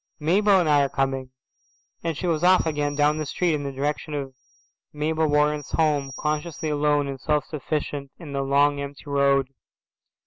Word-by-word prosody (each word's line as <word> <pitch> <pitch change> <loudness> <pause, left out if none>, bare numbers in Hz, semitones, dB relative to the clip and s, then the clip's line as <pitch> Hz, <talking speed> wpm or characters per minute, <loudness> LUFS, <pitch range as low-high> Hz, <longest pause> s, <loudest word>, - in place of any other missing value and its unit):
Mabel 195 +5 +4
and 175 - +1
I 145 -1 +5
are 140 - +1
coming." 135 -1 -1 0.7
And 165 -3 -2
she 185 - -4
was 165 -2 0
off 185 0 +5
again 145 -2 -1
down 150 +1 +2
the 155 - -2
street 175 +3 0
in 150 - -1
the 140 - -3
direction 150 +3 -3
of 135 -2 -4 0.6
Mabel 155 +1 0
Warren's 150 0 +1
home, 145 -4 +1
consciously 155 +1 -2
alone 145 -1 +1
and 135 -2 -6
self 150 0 0
sufficient 145 -2 -4
in 155 -5 -9
the 140 - -1
long 140 +1 +2
empty 140 +1 -8
road. 140 -1 +2
150 Hz, 175 wpm, -24 LUFS, 140-155 Hz, 0.7 s, I